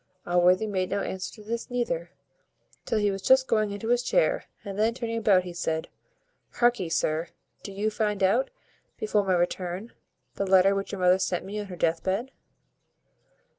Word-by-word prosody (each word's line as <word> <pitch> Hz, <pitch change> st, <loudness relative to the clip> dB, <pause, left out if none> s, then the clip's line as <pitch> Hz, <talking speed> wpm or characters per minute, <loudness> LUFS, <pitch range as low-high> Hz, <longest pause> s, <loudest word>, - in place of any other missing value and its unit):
Allworthy 180 Hz, +3 st, +3 dB
made 185 Hz, -3 st, -1 dB
no 200 Hz, -, -1 dB
answer 185 Hz, -1 st, -4 dB
to 215 Hz, -, -13 dB
this 230 Hz, +4 st, -4 dB
neither, 175 Hz, -9 st, -2 dB, 0.8 s
till -, -, 0 dB
he 205 Hz, -1 st, +2 dB
was 195 Hz, 0 st, -5 dB
just 260 Hz, +5 st, +5 dB
going 215 Hz, -4 st, +1 dB
into 205 Hz, +3 st, -5 dB
his 245 Hz, 0 st, +3 dB
chair, -, -, +1 dB, 0.2 s
and 200 Hz, 0 st, -5 dB
then, 225 Hz, +2 st, +2 dB
turning 230 Hz, -2 st, -3 dB
about, 200 Hz, -4 st, +4 dB
he 180 Hz, -1 st, -7 dB
said 160 Hz, -2 st, -2 dB, 0.7 s
"Harkee, 240 Hz, -8 st, +2 dB
sir, 160 Hz, +1 st, 0 dB, 0.3 s
do 200 Hz, -, -8 dB
you 205 Hz, +3 st, -1 dB
find 210 Hz, -2 st, -1 dB
out, 220 Hz, +8 st, +3 dB, 0.5 s
before 425 Hz, -, +1 dB
my 190 Hz, -1 st, +1 dB
return, 180 Hz, +4 st, -2 dB, 0.4 s
the 200 Hz, -, -1 dB
letter 190 Hz, +1 st, +5 dB
which 195 Hz, 0 st, -3 dB
your 195 Hz, -, -5 dB
mother 180 Hz, +1 st, +5 dB
sent 185 Hz, -2 st, -1 dB
me 205 Hz, +2 st, -5 dB
on 205 Hz, -, -5 dB
her 185 Hz, -, -7 dB
death 165 Hz, -1 st, 0 dB
bed." 205 Hz, +8 st, -2 dB
200 Hz, 180 wpm, -27 LUFS, 185-225 Hz, 0.8 s, just